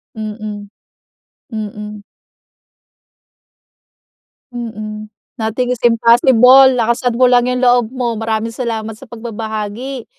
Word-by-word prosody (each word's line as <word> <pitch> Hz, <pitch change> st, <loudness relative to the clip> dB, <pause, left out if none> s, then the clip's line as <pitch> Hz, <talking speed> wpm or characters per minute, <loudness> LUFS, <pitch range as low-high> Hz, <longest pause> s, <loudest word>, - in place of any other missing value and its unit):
Mm. 215 Hz, -1 st, -7 dB, 0.8 s
Mm. 210 Hz, -1 st, -7 dB, 2.5 s
Mm. 215 Hz, -2 st, -6 dB, 0.3 s
Nothing 235 Hz, +3 st, -1 dB
is 250 Hz, -, -5 dB
impossible, 250 Hz, +3 st, +6 dB
lakasan 235 Hz, +1 st, 0 dB
mo 255 Hz, -, +4 dB
lang 245 Hz, -1 st, +4 dB
'yung 250 Hz, 0 st, -1 dB
loob 245 Hz, -1 st, +4 dB
mo. 245 Hz, -2 st, -1 dB
Maraming 225 Hz, 0 st, -2 dB
salamat 225 Hz, -2 st, -4 dB
sa 270 Hz, -, -14 dB
pagbabahagi, 225 Hz, +2 st, -6 dB
230 Hz, 95 wpm, -16 LUFS, 215-245 Hz, 2.5 s, impossible